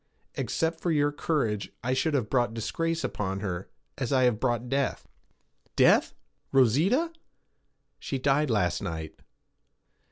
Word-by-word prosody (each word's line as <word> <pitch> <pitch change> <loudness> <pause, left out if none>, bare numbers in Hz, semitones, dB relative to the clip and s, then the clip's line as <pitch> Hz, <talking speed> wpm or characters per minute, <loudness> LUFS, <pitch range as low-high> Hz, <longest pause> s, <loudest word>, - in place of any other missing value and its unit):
Except 160 +6 -1
for 175 - -1
your 145 -2 +2
courage 140 -9 -1
I 125 +2 0
should 150 +3 +1
have 125 -6 0
brought 120 -1 +1
disgrace 165 +8 -2
upon 95 -1 -3
her, 95 -3 -4 0.3
as 130 -1 -2
I 130 -2 +4
have 120 -4 +3
brought 120 -1 0
death.' 135 +1 -1 0.7
'Death? - - +4 0.4
Rosita?' 165 - +3 0.9
'She 135 - -3
died 140 +2 +2
last 90 -6 +1
night.' 80 -2 -5
130 Hz, 130 wpm, -28 LUFS, 110-150 Hz, 0.9 s, I